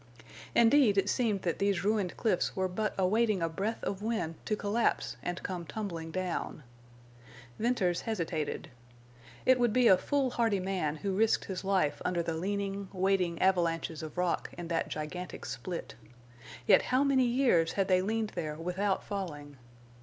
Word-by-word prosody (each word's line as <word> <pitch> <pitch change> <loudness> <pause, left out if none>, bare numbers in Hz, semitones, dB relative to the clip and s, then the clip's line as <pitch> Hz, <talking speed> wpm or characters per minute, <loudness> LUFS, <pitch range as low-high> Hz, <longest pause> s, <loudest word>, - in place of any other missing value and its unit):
Indeed, 235 -3 +5
it 195 +1 +2
seemed 215 -6 0
that 170 - -1
these 200 -3 +1
ruined 205 -3 0
cliffs 210 -6 0
were 190 -1 +1
but 210 +3 -2
awaiting 205 0 +2
a - - +2
breath 200 +7 -3
of 195 0 -3
wind 220 -7 -1
to 215 - +1
collapse 210 +3 0
and 175 0 -4
come 180 -2 -4
tumbling 170 -3 -5
down. 180 -3 -3 1.0
Venters 200 -7 +1
hesitated. 165 -11 -3 0.7
It 260 -1 +5
would 240 -2 +3
be 250 +1 +4
a 185 -3 +7
foolhardy 240 -7 +1
man 185 -5 -1
who 195 +4 -3
risked 220 +2 +2
his 190 -1 -5
life 185 -7 +1
under 175 -1 0
the 165 - -2
leaning, 195 +3 -3
waiting 185 -3 +1
avalanches 170 -4 +1
of 155 0 -8
rock 180 -1 0
in 175 -1 -6
that 165 -1 0
gigantic 165 +4 -6
split. 180 -2 -5 0.7
Yet - - +6
how 255 +2 +2
many 270 -2 +3
years 240 -10 +3
had 195 -1 +1
they 185 -1 +4
leaned 220 +2 -1
there 155 -4 -4
without 180 +5 -1
falling! 150 -8 -5
190 Hz, 160 wpm, -31 LUFS, 170-215 Hz, 1.0 s, a